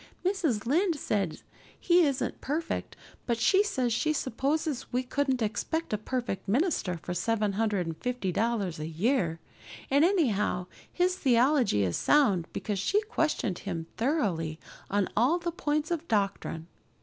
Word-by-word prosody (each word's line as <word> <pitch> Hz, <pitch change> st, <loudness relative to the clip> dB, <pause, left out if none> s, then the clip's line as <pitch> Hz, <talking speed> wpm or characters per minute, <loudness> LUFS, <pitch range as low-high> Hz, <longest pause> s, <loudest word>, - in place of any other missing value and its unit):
Mrs. 330 Hz, -, 0 dB
Lynde 335 Hz, +7 st, +2 dB
says 200 Hz, -, -2 dB, 0.4 s
he 350 Hz, 0 st, +4 dB
isn't 270 Hz, -1 st, -2 dB
perfect, 315 Hz, +4 st, -3 dB, 0.3 s
but 235 Hz, -2 st, +1 dB
she 380 Hz, -, +4 dB
says 255 Hz, -, 0 dB
she 310 Hz, +7 st, +1 dB
supposes 280 Hz, +2 st, -1 dB
we 250 Hz, +1 st, 0 dB
couldn't 260 Hz, -1 st, 0 dB
expect 220 Hz, +9 st, -2 dB
a -, -, +2 dB
perfect 240 Hz, -3 st, -3 dB
minister 230 Hz, -, +1 dB
for 175 Hz, -, -3 dB
seven 210 Hz, +2 st, 0 dB
hundred 205 Hz, -3 st, 0 dB
and 165 Hz, -1 st, -4 dB
fifty 245 Hz, -7 st, -2 dB
dollars 205 Hz, -5 st, -1 dB
a 155 Hz, -, -4 dB
year, 170 Hz, -, 0 dB, 0.5 s
and 280 Hz, +2 st, +5 dB
anyhow 240 Hz, -, +2 dB, 0.3 s
his 360 Hz, +1 st, +1 dB
theology 250 Hz, -, +3 dB
is 90 Hz, -3 st, 0 dB
sound 205 Hz, -, +3 dB
because 205 Hz, -2 st, -3 dB
she 390 Hz, -, +2 dB
questioned 305 Hz, -, -1 dB
him 170 Hz, -5 st, -4 dB
thoroughly 190 Hz, -, 0 dB, 0.3 s
on 200 Hz, -1 st, +1 dB
all 255 Hz, +10 st, +3 dB
the 345 Hz, -1 st, -3 dB
points 305 Hz, -2 st, -1 dB
of 335 Hz, -1 st, -2 dB
doctrine. 200 Hz, -6 st, -1 dB
240 Hz, 150 wpm, -29 LUFS, 195-305 Hz, 0.5 s, and